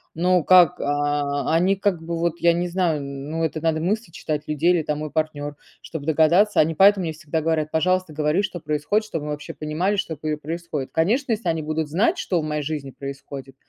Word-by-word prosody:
Но 180 Hz, 0 st, +2 dB
как, 180 Hz, -1 st, +6 dB
а, 145 Hz, 0 st, 0 dB
они 185 Hz, +4 st, +3 dB
как 185 Hz, -4 st, -1 dB
бы 170 Hz, +1 st, -3 dB
вот 170 Hz, -1 st, +1 dB
я 170 Hz, 0 st, +4 dB
не 175 Hz, +1 st, -1 dB
знаю, 170 Hz, -4 st, 0 dB
ну, 140 Hz, +4 st, -4 dB
это 155 Hz, 0 st, -2 dB
надо 160 Hz, -1 st, +1 dB
мысли 200 Hz, +2 st, -1 dB
читать 150 Hz, -2 st, -4 dB
людей 155 Hz, +3 st, +1 dB
или 170 Hz, -3 st, +2 dB
там 150 Hz, 0 st, -2 dB
мой 155 Hz, 0 st, -4 dB
партнёр, 145 Hz, -2 st, -2 dB, 0.3 s
чтобы 155 Hz, -3 st, -7 dB
догадаться. 165 Hz, +7 st, +4 dB
Они 160 Hz, +1 st, +3 dB
поэтому 195 Hz, +1 st, +6 dB
мне 160 Hz, -, -3 dB
всегда 155 Hz, +1 st, -3 dB
говорят: 155 Hz, -1 st, 0 dB
"Пожалуйста, 185 Hz, +1 st, +1 dB
говори, 155 Hz, +6 st, +1 dB
что 180 Hz, -3 st, -4 dB
происходит, 155 Hz, +8 st, 0 dB
чтобы 155 Hz, -7 st, -4 dB
мы 150 Hz, -, -3 dB
вообще 150 Hz, 0 st, -6 dB
понимали, 160 Hz, +7 st, -1 dB
что 165 Hz, -5 st, -2 dB
п 155 Hz, +1 st, -3 dB
происходит". 155 Hz, -2 st, -5 dB
Конечно, 230 Hz, -, +1 dB
если 210 Hz, -5 st, -1 dB
они 160 Hz, -2 st, -1 dB
будут 155 Hz, 0 st, -2 dB
знать, 220 Hz, -, +1 dB
что 175 Hz, -3 st, 0 dB
в -, -, -6 dB
моей 150 Hz, -1 st, -2 dB
жизни 145 Hz, -2 st, -4 dB
происходит, 135 Hz, 0 st, -8 dB
160 Hz, 210 wpm, -23 LUFS, 150-175 Hz, 0.3 s, как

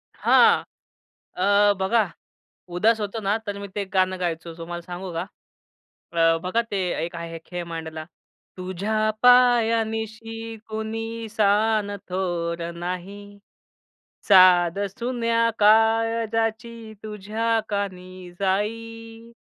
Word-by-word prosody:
हां. -, -, +5 dB, 0.7 s
अ, 200 Hz, +2 st, +4 dB
बघा 195 Hz, 0 st, +1 dB, 0.7 s
उदास 220 Hz, +4 st, +3 dB
होतो 210 Hz, +2 st, -3 dB
ना, 200 Hz, +1 st, +1 dB
तर 205 Hz, -2 st, -6 dB
मी 200 Hz, -, -7 dB
ते 205 Hz, -, -2 dB
गाणं 185 Hz, 0 st, +1 dB
गायचो, 165 Hz, -1 st, -3 dB
तुम्हाला 175 Hz, +1 st, -6 dB
सांगू 180 Hz, +1 st, -7 dB
का? 165 Hz, -, -2 dB, 0.9 s
अ, 165 Hz, 0 st, +3 dB
बघा 185 Hz, +6 st, +1 dB
ते 200 Hz, -, -1 dB, 0.3 s
एक 175 Hz, -, -8 dB
आहे 170 Hz, 0 st, -6 dB
खेळ 175 Hz, -1 st, -5 dB
मांडला. 160 Hz, -1 st, -6 dB, 0.5 s
"तुझ्या 190 Hz, +4 st, -2 dB, 0.2 s
पाया 245 Hz, -2 st, +5 dB
निशी 225 Hz, +1 st, -6 dB
कुणी 225 Hz, +1 st, -5 dB
सान 210 Hz, -1 st, +1 dB
थोर 175 Hz, -2 st, -2 dB
नाही. 195 Hz, +4 st, -7 dB, 0.9 s
साद 185 Hz, -2 st, +6 dB, 0.2 s
सुन्या 230 Hz, -1 st, +1 dB
काळजाची 225 Hz, +1 st, +2 dB
तुझ्या 215 Hz, +2 st, -1 dB
कानी 185 Hz, -3 st, -5 dB
जाई, 225 Hz, +3 st, -3 dB
205 Hz, 105 wpm, -24 LUFS, 180-225 Hz, 0.9 s, साद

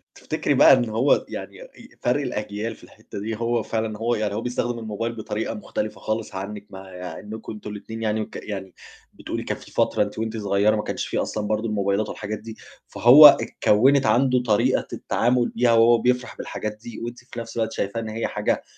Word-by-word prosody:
تفتكري -, -, -1 dB
بقى -, -, +7 dB
إن 125 Hz, -3 st, +2 dB
هو 115 Hz, +6 st, +2 dB
يعني -, -, -7 dB
أ -, -, -12 dB, 0.3 s
فَرق 125 Hz, +4 st, +1 dB
الأجيال 105 Hz, -3 st, -4 dB
في -, -, -20 dB
الحتّة -, -, -10 dB
دي 110 Hz, +2 st, -3 dB
هو 115 Hz, +1 st, 0 dB
فعلًا 110 Hz, -1 st, -3 dB
هو، 120 Hz, +2 st, 0 dB
يعني 105 Hz, -1 st, -2 dB
هو 110 Hz, -, -2 dB
بيستخدم 120 Hz, 0 st, -2 dB
الموبايل 115 Hz, +1 st, -4 dB
بطريقة 110 Hz, 0 st, -3 dB
مختلفة 105 Hz, 0 st, -5 dB
خالص 110 Hz, -1 st, -3 dB
عنِك 100 Hz, +2 st, -6 dB
مع 95 Hz, 0 st, -10 dB, 0.3 s
إنكم 110 Hz, +2 st, -8 dB
أنتم 105 Hz, 0 st, -8 dB
الاتنين 110 Hz, +2 st, -7 dB
يعني 110 Hz, 0 st, 0 dB
وك -, -, -7 dB
يعني 95 Hz, -3 st, -6 dB, 0.4 s
بتقولي -, -, -5 dB
كان -, -, -3 dB
في -, -, -15 dB
فترة -, -, +2 dB
أنتِ 105 Hz, +1 st, -7 dB
وأنتِ 110 Hz, 0 st, -3 dB
صغيّرة 100 Hz, +1 st, +2 dB
ما 105 Hz, -, -2 dB
كانش -, -, -3 dB
فيه -, -, -1 dB
أصلًا 105 Hz, -1 st, -3 dB
برضو 110 Hz, +2 st, -1 dB
الموبايلات 100 Hz, 0 st, 0 dB
والحاجات 105 Hz, 0 st, -5 dB
دي، 110 Hz, 0 st, -10 dB, 0.3 s
فهو 120 Hz, +9 st, +8 dB
اتكوّنِت 135 Hz, 0 st, +3 dB
عنده 125 Hz, -1 st, +3 dB
طريقة 110 Hz, -4 st, +2 dB
التعامل 120 Hz, 0 st, +1 dB
بيها 120 Hz, 0 st, +3 dB
وهو 115 Hz, +1 st, +6 dB
بيفرح 125 Hz, +1 st, 0 dB
بالحاجات 105 Hz, 0 st, -5 dB
دي، 120 Hz, -, -8 dB
وأنتِ 120 Hz, +1 st, -6 dB
في 125 Hz, -1 st, -9 dB
نفْس 115 Hz, 0 st, -8 dB
الوقت 110 Hz, -1 st, 0 dB
شايفة 100 Hz, +3 st, -2 dB
إن 110 Hz, -1 st, -5 dB
هي 110 Hz, +1 st, -2 dB
حاجة -, -, -1 dB
110 Hz, 200 wpm, -23 LUFS, 105-120 Hz, 0.4 s, فهو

